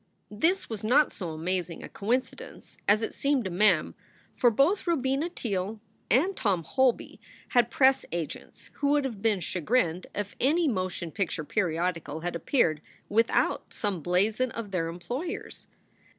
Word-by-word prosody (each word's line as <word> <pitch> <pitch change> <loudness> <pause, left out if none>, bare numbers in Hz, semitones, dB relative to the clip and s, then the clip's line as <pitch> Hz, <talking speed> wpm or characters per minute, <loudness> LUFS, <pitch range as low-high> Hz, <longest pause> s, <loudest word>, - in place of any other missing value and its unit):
This 335 - +1
was 220 -3 -6
not 275 +7 +4
so 180 -4 -5
amazing 170 +2 -3
a - - -6
coincidence 240 +6 -3
as 215 +2 +4
it - - -3
seemed 280 -3 +1
to 190 - -4
Mem, 180 -3 +3 0.4
for 245 - +5
both 290 - +2
Robina 280 0 +1
Teele 210 - -3 0.3
and 340 - +3
Tom 190 -7 0
Holby 260 - +1 0.3
had 240 -2 +3
press 265 +2 +4
agents 170 -2 -6
who 285 - 0
would 290 -1 +3
have 225 -7 -5
been 210 -4 +2
chagrined 180 0 0
if 205 -1 -4
any 315 +6 +3
motion 185 - -2
picture 175 -5 -2
periodical 165 -3 -1
had 175 0 -3
appeared 165 - +1 0.3
without 225 +2 +1
some 200 -5 -2
blazon 205 +9 +1
of 225 -3 -6
their 175 -3 0
employers. 240 - -5
210 Hz, 150 wpm, -28 LUFS, 180-260 Hz, 0.4 s, for